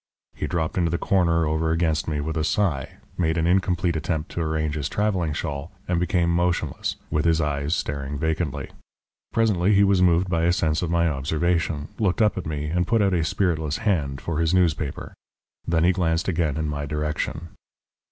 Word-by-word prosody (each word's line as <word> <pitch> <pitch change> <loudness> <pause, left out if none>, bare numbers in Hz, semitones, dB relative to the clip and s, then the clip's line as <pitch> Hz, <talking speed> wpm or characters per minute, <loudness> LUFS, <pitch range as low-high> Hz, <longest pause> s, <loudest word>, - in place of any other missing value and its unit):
He - - -4
dropped 85 0 -1
into 85 -2 +2
the 85 - 0
corner 85 -4 +2
over 80 +1 0
against 80 -1 +1
me 75 -2 -1
with 80 +2 -3
a 80 - 0
sigh, 80 -5 0 0.3
made 80 -1 +1
an 80 - +1
incomplete 90 -1 +1
attempt 80 0 -2
to 85 - -3
arrange 80 -1 -1
his 75 -2 -2
travelling 95 -6 0
shawl, 75 +1 -4 0.2
and 90 -1 +1
became 90 0 +1
motionless, 85 -4 0 0.2
with 75 - +1
his 85 -1 +3
eyes 75 0 0
staring 70 0 -3
vacantly. 80 -1 -2 0.6
Presently 105 -3 +2
he 100 - +5
was 100 -2 +3
moved 90 0 +4
by 85 -2 +1
a 85 - +3
sense 80 -3 +1
of 85 - -2
my 85 0 +2
observation, 75 +1 0
looked 100 -3 +1
up 105 -2 +3
at 90 -4 -4
me, 75 -1 -3
and 90 +3 0
put 115 -2 +3
out 100 -1 +2
a 85 -2 +2
spiritless 80 -4 0
hand 70 -10 -1
for 80 -2 -3
his 85 +2 +2
newspaper. 80 -5 0 0.5
Then 85 -1 +2
he 90 - +5
glanced 85 -3 0
again 80 -5 0
in 80 -1 -1
my 75 -1 -3
direction. 75 +2 -3
80 Hz, 190 wpm, -24 LUFS, 75-90 Hz, 0.6 s, he